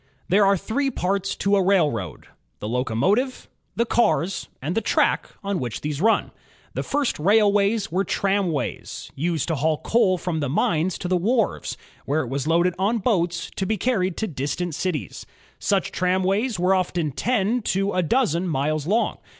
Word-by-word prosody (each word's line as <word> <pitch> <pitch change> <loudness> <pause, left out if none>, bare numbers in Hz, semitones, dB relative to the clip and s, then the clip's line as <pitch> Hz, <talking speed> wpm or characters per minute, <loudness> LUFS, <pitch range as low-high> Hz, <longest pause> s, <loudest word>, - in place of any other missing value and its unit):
There 195 +2 +5
are 195 0 +4
three 270 +9 -1
parts 195 -4 -1
to 200 0 +1
a 195 - +3
railroad: 155 - +1 0.3
the 105 - -6
locomotive, 135 - 0 0.3
the 235 - +1
cars, 195 -6 +1
and 150 +6 -3
the 225 - 0
track - - +1
on 200 -2 -1
which 120 -3 -4
these 150 0 -3
run. 225 +2 +2 0.4
The - - -2
first 285 - -1
rail 205 +5 +4
ways 205 0 +1
were 185 +3 +1
tramways, 190 -8 -2
used 160 +1 -1
to 165 - +1
haul 155 +2 +1
coal 190 -3 +2
from 175 -2 -2
the 145 -3 -1
mines 165 +5 +1
to 180 - -4
the 180 0 +1
wharves, 225 +4 0 0.3
where 150 +3 +1
it 125 - -5
was 135 +2 -2
loaded 170 +2 +3
on 205 +5 +2
boats 175 -6 0
to 190 - -1
be 220 - 0
carried 190 -6 0
to 220 - -1
distant 150 +2 -3
cities. 150 - -3 0.3
Such 195 -3 0
tramways 190 +6 +1
were 180 +2 +3
often 175 -4 0
ten 230 - 0
to 195 0 0
a 185 - +2
dozen 185 - +1
miles 155 0 -1
long. 220 +5 +1
185 Hz, 175 wpm, -23 LUFS, 160-205 Hz, 0.4 s, There